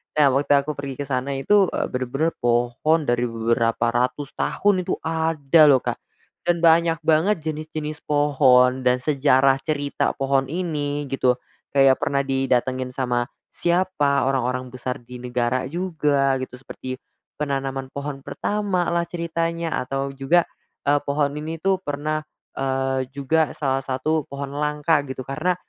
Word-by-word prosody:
Nah, 150 -2 +5
waktu 145 - +2
aku 150 - -3
pergi 140 -1 -5
ke - - -1
sana 135 0 -2
itu, 190 +8 +3
eee, - - -2
bener-bener 135 +6 -1
pohon 120 +7 +1
dari 120 -2 +1
beberapa 115 0 0
ratus 125 +4 -1
tahun 190 -3 +1
itu - - +1
ada, 160 -2 +2
lho, 135 -3 +5
Kak. - - -3 0.5
Dan 170 -1 +1
banyak 165 -1 +4
banget 160 +3 +2
jenis-jenis 155 0 -4
pohon 130 -3 +4
dan 125 0 +2
sejarah 135 -2 +3
cerita 145 -1 -1
pohon 135 0 +1
ini, 145 -3 -2
gitu, 130 -2 +2 0.4
kayak 135 -1 +5
pernah 140 0 0
didatengin 130 -1 0
sama 125 -2 0 0.2
siapa, 175 -5 +1
orang-orang 125 -1 -1
besar 125 0 -4
di 125 +1 -10
negara 125 +1 -1
juga, 150 -5 +1
gitu, 130 -1 -6
seperti 130 0 -7 0.4
penanaman 135 -2 -2
pohon 140 -1 -6
pertama, 200 -2 -1
lah, 170 0 +1
ceritanya, 170 -1 -2
atau 135 +1 -2
juga, 160 +6 +2 0.4
eee, 145 0 +4
pohon 140 0 0
ini, 155 +2 -5
tuh, 195 +2 +2
pernah, 155 -2 -3 0.3
eee, 135 -1 -1
juga 140 +3 +1
salah 135 -2 -1
satu 145 +4 -1
pohon 140 0 -5
langka, 150 +1 +1
gitu, 130 0 -5
karena 155 +6 0
140 Hz, 145 wpm, -23 LUFS, 130-160 Hz, 0.5 s, Nah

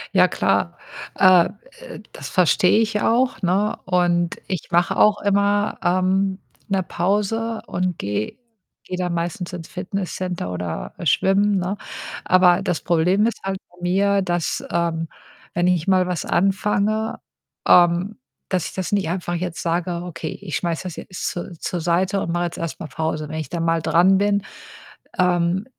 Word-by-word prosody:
Ja - - +6
klar, 85 - 0 0.4
äh, 185 -3 +7
äh, - - -11
das - - -7
verstehe 180 +2 +4
ich 215 -2 0
auch, 250 +1 +2
ne, 195 +4 +1
und 175 -1 +1
ich 185 -5 -4
mache 180 +3 +2
auch 210 -1 +4
immer, 205 +1 +1
ähm, 190 +2 +1 0.3
‘ne 195 -2 +1
Pause 210 +6 -1
und 180 -1 -1
gehe 105 +1 -3 0.5
gehe 180 - -5
dann 180 -1 -1
meistens 170 +1 -3
ins 165 -2 -6
Fitnesscenter 180 - -4
oder 85 -8 -4
schwimmen, 200 +1 +3
ne, 185 +3 -2 0.5
aber 185 0 +5
das 175 - -1
Problem 180 +5 +2
ist 235 - -3
halt 195 0 -2
bei 175 - -23
mir, 195 +2 +2
dass, 175 -2 -1
ähm, 165 -1 -1 0.4
wenn 175 +1 +1
ich 180 -2 +1
mal 185 -1 +3
was 180 -3 -2
anfange, 205 +4 +1 0.5
ähm, 175 +4 +4 0.3
dass 185 -3 0
ich - - -14
das 185 0 -3
nicht 195 -5 +1
einfach 175 -1 -2
jetzt 175 -1 -4
sage: 170 +1 -1
„Okay, 170 -3 -6
ich 180 -6 -4
schmeiße 170 0 -2
das 180 -3 -6
jetzt 185 - -6
zur 175 +1 -6
zur 175 -2 -3
Seite 185 +4 +1
und 170 - -2
mache 175 0 0
jetzt 170 - -5
erst 165 -1 -4
mal 165 - -6
Pause.“ 155 +1 -3
Wenn 155 - -5
ich 155 - -5
da 170 - -3
mal 165 0 +1
dran 185 +4 +4
bin, 200 0 +1 0.7
ähm, 180 +2 +2
180 Hz, 165 wpm, -22 LUFS, 170-195 Hz, 0.7 s, äh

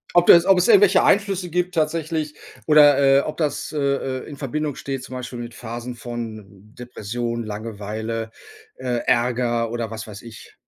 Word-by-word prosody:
Ob 175 0 +5
das 170 0 +8
ob 190 -1 +5
es 180 - +2
irgendwelche 200 -3 +6
Einflüsse 195 -3 +2
gibt 180 +1 -1
tatsächlich 155 -1 -1 0.3
oder, 150 -2 +6 0.2
äh, - - +4
ob 155 - -6
das, 150 -3 -2
äh, 150 - -3
äh, 140 -1 -2
in 145 - -8
Verbindung 145 +1 -3
steht, 135 -2 -5
zum 130 0 -9
Beispiel 125 -1 -6
mit 120 -1 -7
Phasen 120 +1 -7
von 115 -3 -7 0.3
Depression, 120 0 -4
Langeweile, 110 +1 -5 0.5
äh, 125 -2 -2
Ärger 120 -1 +1
oder 115 -1 -4
was 115 0 -7
weiß 105 -1 -10
ich. 115 -2 -13
125 Hz, 170 wpm, -22 LUFS, 115-155 Hz, 0.5 s, das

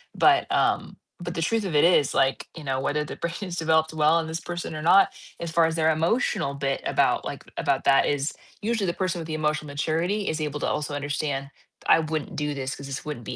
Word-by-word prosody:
but, 355 -2 +5
um - - +1 0.2
but 175 0 -4
the 165 - -3
truth 225 +6 +1
of 185 -5 -3
it 145 - +5
is, 160 -5 +4
like, 135 0 +1
you 160 - -8
know, 135 -1 -1
whether 150 +2 0
the - - -7
brain 170 0 -3
has 180 -4 -4
developed 160 -1 +2
well 155 +2 +4
in 160 - -3
this 160 +1 -4
person 175 -2 -5
or 155 - -4
not, 195 +5 +5 0.3
as 170 - -4
far 165 0 +3
as 160 - 0
their 160 -1 +3
emotional 165 - +1
bit 140 -1 -2
about - - +2
like, - - -5
about - - 0
that 135 - +5
is 145 +1 0 0.3
usually 220 -2 0
the 170 - 0
person 185 -1 -2
with 165 - -5
the 160 - -5
emotional 150 -1 -1
maturity 165 +8 -1
is 160 0 -1
able 150 -1 -3
to - - -1
also 150 0 -2
understand, 145 -1 -2 0.4
"I - - +6
wouldn't 155 -2 -3
do 150 0 -1
this 135 -1 -4
'cause 140 - -9
this 140 0 -6
wouldn't 150 -6 -5
be - - -5
155 Hz, 240 wpm, -25 LUFS, 145-170 Hz, 0.4 s, I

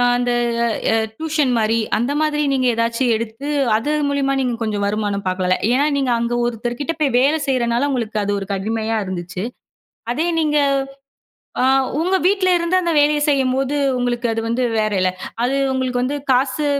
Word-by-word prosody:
அந்த 245 0 0 0.6
அ - - +3 0.2
டியூஷன் 310 -4 0
மாரி. 225 0 +1 0.2
அந்த 240 +5 -1
மாதிரி, 300 -1 +1
நீங்க 260 -1 +1
ஏதாச்சும் 230 +2 0
எடுத்து, 225 +5 -5 0.3
அது 240 +7 -2 0.2
மூலியமா, 280 -1 0
நீங்க 250 -2 0
கொஞ்சம் 210 -2 -2
வருமானம் 205 -1 -2
பாக்கலால. 185 0 +1
ஏன்னா, 270 +4 +3
நீங்க 270 -3 0
அங்க 235 +1 -1
ஒருத்தர் 240 0 -3
கிட்ட 330 +3 -1
போய், 275 -5 +2
வேலை 285 +5 +3
செய்றனால, 245 0 +1
உங்களுக்கு 230 -4 -2
அது 205 - -1
ஒரு, 195 - -5
கடிமையா 220 +3 -2
இருந்துச்சு. 180 0 -5 0.7
அதே 315 +8 0
நீங்க, 300 -2 +1 1.0
ஆ - - +2 0.4
உங்க 365 +3 +2
வீட்ல 380 -1 +2
இருந்து, 340 +2 0
அந்த 340 -1 0
வேலய 295 +1 +3
செய்யம்போது, 270 0 +1 0.2
உங்களுக்கு 245 0 -1
அது 225 - -1
வந்து 240 +2 0 0.2
வேறல. 195 -4 +1 0.3
அது 265 +3 0 0.2
உங்களுக்கு 255 -1 -1
வந்து, 285 +3 -1
காசு. 275 +4 +1
245 Hz, 160 wpm, -19 LUFS, 225-285 Hz, 1.0 s, அ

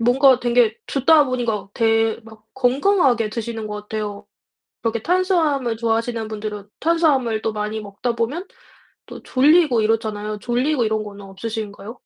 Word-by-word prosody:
뭔가 255 +2 +4
되게 240 -2 +2
듣다 295 +2 +4
보니까 235 -6 -2
되 225 0 +2
막 220 -1 -15
건강하게 265 - +2
드시는 225 -1 -4
것 210 0 -5
같아요. 210 -1 -5 0.6
그렇게 230 -1 -1
탄수화물 320 - +1
좋아하시는 230 -1 -1
분들은 210 -1 -6
탄수화물 285 -9 +2
또 220 - -2
많이 210 +1 -3
먹다 210 +4 -4
보면 260 - -2 0.6
또 - - -10
졸리고 285 -3 +4
이렇잖아요. 215 -1 -1
졸리고 245 +3 0
이런 215 0 0
거는 205 -1 -10
없으신가요? 210 +2 -6
230 Hz, 345 characters per minute, -21 LUFS, 215-260 Hz, 0.6 s, 뭔가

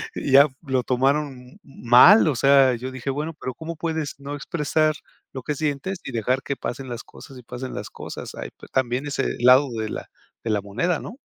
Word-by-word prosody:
Y 135 - -3
ya, 140 +2 +8
lo 130 -4 -1
tomaron 135 +4 +1
m 125 +1 -17
mal. 135 - +6
O 145 - 0
sea, 135 +1 +5
yo 125 +3 -6
dije, 130 +1 -5
bueno 150 +4 -4
pero, 130 - -4
¿cómo 165 +3 -6
puedes 160 -3 -3
no 140 +1 -6
expresar 155 +1 0 0.4
lo 130 -2 -6
que 150 - -2
sientes 155 +5 -2
y - - -5
dejar 125 +4 0
que 140 - -3
pasen 130 +1 -5
las 120 -1 -6
cosas 135 - -14
y 125 - -12
pasen 125 +2 -7
las - - -6
cosas? - - -8
Hay - - -6 0.2
también 130 +1 0
ese 135 -2 -2
lado 130 +3 +6
de 110 -1 -3
la - - -6 0.3
de 115 - -3
la 105 -1 +1
moneda, 120 - -1
¿no? 245 - -9
135 Hz, 205 wpm, -23 LUFS, 125-150 Hz, 0.4 s, ya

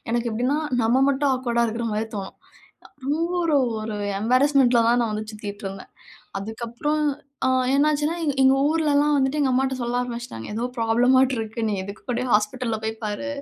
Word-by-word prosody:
எனக்கு 235 0 0
எப்டின்னா, 250 +6 0 0.3
நம்ம 240 +4 +3
மட்டும் 280 0 +1
ஆக்வர்டா 240 -2 0
இருக்கிற 230 +1 -3
மாரி 215 +1 -1
தோணும், 195 -2 -6 0.7
ரொம்ப 310 +4 0 0.2
ஒரு 320 -3 +2 0.3
ஒரு 215 -1 -4 0.3
எம்பாரஸ்மெண்ட்டில 255 0 +4
தான் 240 +1 +3
நான் 230 - -1
வந்து 215 0 -4
சுத்திட்டுருந்தேன், 200 -2 -7 0.5
அதுக்கப்புறம் 235 +8 -3 0.4
ஆ - - +3 0.3
என்னாச்சுன்னா, 300 +3 +2
எங்க 290 -3 0
எங்க 265 +1 +5
ஊர்லலாம் 295 -2 +2
வந்துட்டு, 270 +2 +1
எங்க 275 -2 +2
அம்மாட்ட 265 +1 +1
சொல்ல 240 +1 -1
ஆரம்பிச்சுட்டாங்க, 240 - -6
ஏதோ 235 +3 -1
ப்ராப்ளமாட்டு 250 +3 +3
இருக்கு, 225 +1 -4
நீ - - -1
எதுக்கு 200 +2 -9
கூட 245 +1 -1
ஹாஸ்பிட்டலில 225 +2 0
போய் 220 - -2
பாரு, 210 +7 -3
245 Hz, 160 wpm, -23 LUFS, 220-275 Hz, 0.7 s, எங்க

